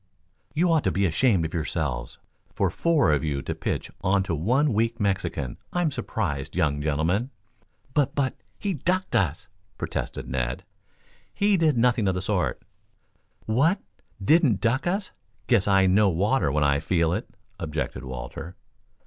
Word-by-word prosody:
"You 175 +2 +3
ought 160 -3 +3
to - - +3
be 100 +1 +1
ashamed 95 0 +2
of 80 - -5
yourselves 80 -3 -2 0.4
for - - +1
four 165 - +2
of 75 -2 +1
you 70 -3 -2
to - - -3
pitch - - -3
on 95 0 +3
to 90 - -3
one 125 - +2
weak 115 +2 0
Mexican! 90 - -1
I'm 175 -3 +1
surprised, 100 - -3
young 75 -5 +1
gentlemen." 80 - 0 0.6
"But 145 -4 +1
but 135 -2 +1 0.2
he 200 -2 -2
ducked 185 +5 -1
us," 95 +2 0 0.3
protested - - -4
Ned. 60 0 -2 0.7
"He 205 0 +2
did 160 -7 +3
nothing 115 -3 +3
of 95 - +1
the 90 - -2
sort." - - -1 0.8
"What 140 - +3 0.4
didn't 125 - +4
duck 120 +7 +1
us? 195 +2 -1 0.3
Guess 115 -6 +3
I 95 -1 +5
know 100 +2 +4
water 95 - +1
when 75 +1 +1
I 70 0 +3
feel 85 -1 +1
it," 105 +6 -3 0.3
objected 75 -6 -3
Walter. 65 +7 -7
100 Hz, 155 wpm, -25 LUFS, 80-130 Hz, 0.8 s, I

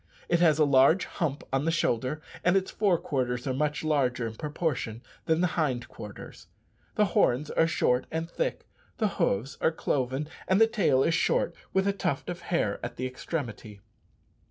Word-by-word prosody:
It 170 - +3
has 160 -4 +5
a 155 - +5
large 140 +6 +5
hump 145 -4 -3
on 135 +2 +1
the - - +2
shoulder, 150 -2 0 0.2
and 180 +2 +4
its 190 0 -1
fore 200 -5 +2
quarters 125 -5 -2
are 130 - -1
much 150 +3 -1
larger, 130 -6 +1
in 110 - -4
proportion, 145 -5 -3 0.2
than 160 +1 +2
the - - +4
hind 130 -7 0
quarters. 105 -2 -10 0.5
The 210 - +4
horns 145 -6 +2
are 165 - +3
short 130 -7 +1
and 160 +1 -3
thick, - - -3 0.3
the 220 - +2
hoofs 125 +8 0
are - - +3
cloven, 135 -2 -1 0.2
and 190 +2 +3
the 225 - +8
tail 195 -12 +2
is 165 - +2
short, 170 - +1 0.2
with 190 +1 +1
a 200 - +2
tuft 180 -5 -2
of 175 - -6
hair 170 - -1
at - - -5
the 130 - -3
extremity. 125 -6 -5
150 Hz, 180 wpm, -28 LUFS, 130-170 Hz, 0.5 s, the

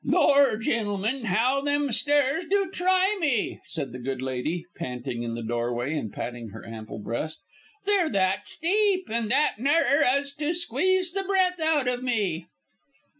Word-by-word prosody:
"Lor', 280 -5 +4
gentlemen, 220 +2 -1
how 245 +7 +2
them 285 -1 +1
stairs 290 +7 +2
do 395 -1 +1
try 370 +3 +2
me!" 260 -9 0
said 155 -7 -4
the 125 - -7
good 130 +1 -3
lady, 130 +7 -3
panting 125 -1 -5
in 115 -1 -3
the 115 - -5
doorway 120 +4 -2
and 115 -9 -3
patting 120 -2 -6
her 110 +3 -11
ample 110 -1 -8
breast; 115 +9 -4 0.5
"they're 395 -5 +2
that 195 0 0
steep 380 - +1
and 230 -1 -1
that 265 -3 +2
narrer, 285 +2 +3
as 280 +2 +1
to 300 +4 -1
squeeze 355 +4 +1
the 390 +2 -1
breath 375 -2 +1
out 315 -4 +2
of 250 0 0
me." 200 -10 -1
245 Hz, 160 wpm, -26 LUFS, -, 0.5 s, Lor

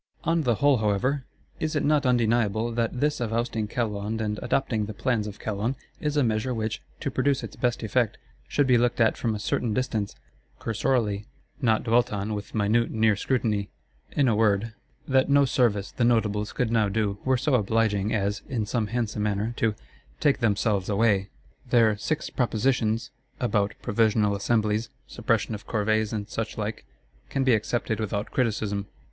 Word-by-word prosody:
On 165 +1 +2
the 120 -6 +2
whole, 140 +2 +4
however, 120 +6 0 0.3
is 155 0 -2
it 150 - +1
not 145 -2 +3
undeniable 115 -2 +2
that 115 +1 -1
this 150 0 +1
of 115 -3 -2
ousting 115 -2 -1
Calonne 105 -1 -2
and 105 -1 -2
adopting 120 -4 0
the 110 - -7
plans 115 -4 0
of 105 - -7
Calonne, 110 +4 -2 0.2
is 150 0 -1
a 145 - +4
measure 115 +2 0
which, 110 -1 -3 0.2
to - - -2
produce 140 -1 +1
its - - -7
best 120 -2 -1
effect, 110 +1 +1 0.3
should 145 - +2
be 125 -2 +4
looked 120 0 +1
at 115 -1 +4
from 115 -3 -1
a - - -4
certain 105 +2 -1
distance, 110 -6 -1 0.4
cursorily; 110 -2 0 0.3
not 115 -4 +2
dwelt 120 +1 +2
on 105 +1 -2
with 105 0 -6
minute 110 +3 +2
near 110 -1 +3
scrutiny. 105 -3 0 0.4
In 140 - +3
a 115 - +3
word, 110 0 +2 0.3
that 130 0 +3
no 140 0 +5
service 120 -6 +1
the 120 - -1
Notables 105 -3 +1
could 125 -3 -1
now 110 -3 +3
do 100 -1 -1
were 130 -1 +2
so 135 +3 0
obliging 110 -2 +2
as, 100 -1 0
in 115 -5 -1
some 110 0 -1
handsome 115 -2 -2
manner, 105 +2 -1
to—take 115 +6 -2
themselves 105 -4 +1
away! 100 -2 +2 0.4
Their 115 -3 +4
"Six 150 +9 -3
Propositions" 120 0 0 0.3
about 105 -5 0
Provisional 105 -1 +2
Assemblies, 105 +1 0 0.2
suppression 115 -1 -1
of 105 - -7
Corvées 110 -1 +1
and 105 -2 -3
suchlike, 110 -1 -4 0.4
can 135 - 0
be 130 -2 +4
accepted 110 +1 0
without 105 -1 -2
criticism. 105 -4 -1
110 Hz, 170 wpm, -26 LUFS, 105-125 Hz, 0.4 s, no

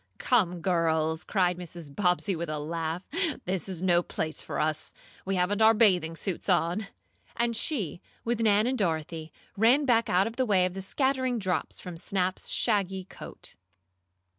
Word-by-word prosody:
"Come, 180 -8 +1
girls!" 160 -2 +1
cried 180 -3 +1
Mrs. 170 -4 -9
Bobbsey 185 0 +1
with 170 -1 -4
a 155 - -2
laugh, 165 +3 -3 0.4
"this 190 +1 -2
is 185 -2 -3
no 175 -2 +4
place 155 -2 -4
for - - -4
us. 155 0 -1 0.3
We 195 0 -1
haven't 190 +4 +1
our 220 +1 +7
bathing 180 -7 +3
suits 190 +2 -3
on!" 180 +3 +1 0.5
and 235 0 0
she, 205 - -1 0.2
with 235 0 0
Nan 210 -1 +4
and 255 0 0
Dorothy, 160 -3 -2 0.2
ran 245 +8 +4
back 230 -3 +3
out 185 +2 +3
of 225 +1 -5
the 260 - +2
way 190 -3 +4
of 180 - -2
the 195 - -5
scattering 260 +4 0
drops 185 -7 -2
from 180 -2 -8
Snap's 185 +1 -1
shaggy 195 -4 +1
coat. 185 - -11
185 Hz, 165 wpm, -28 LUFS, 170-215 Hz, 0.5 s, our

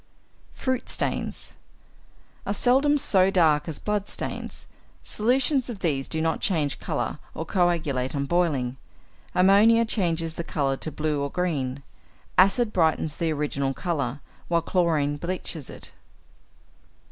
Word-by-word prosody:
=Fruit 260 -1 -2
Stains= - - -3 0.9
are 200 - 0
seldom 270 +6 +4
so 190 -8 +4
dark 160 -6 +3
as 155 - -3
blood 210 -1 -2
stains. - - -5 0.4
Solutions 255 +4 +1
of 220 -5 -6
these 140 -6 0
do 160 - -3
not 160 0 0
change 155 -7 0
colour - - -3 0.2
or 160 - -4
coagulate 155 -8 0
on 140 0 -1
boiling; 140 -7 0 0.6
ammonia 210 +5 +6
changes 170 -7 0
the 170 - -4
colour 140 -4 0
to 155 - -4
blue 150 -2 -1
or 140 - -1
green; 140 -6 -2 0.5
acid 210 +4 +4
brightens 160 -3 +1
the 165 -1 0
original 140 -3 -1
colour, 145 -6 -2 0.3
while 170 -1 +1
chlorine 160 -6 +1
bleaches 170 -3 -4
it. - - -4
165 Hz, 130 wpm, -25 LUFS, 145-195 Hz, 0.9 s, ammonia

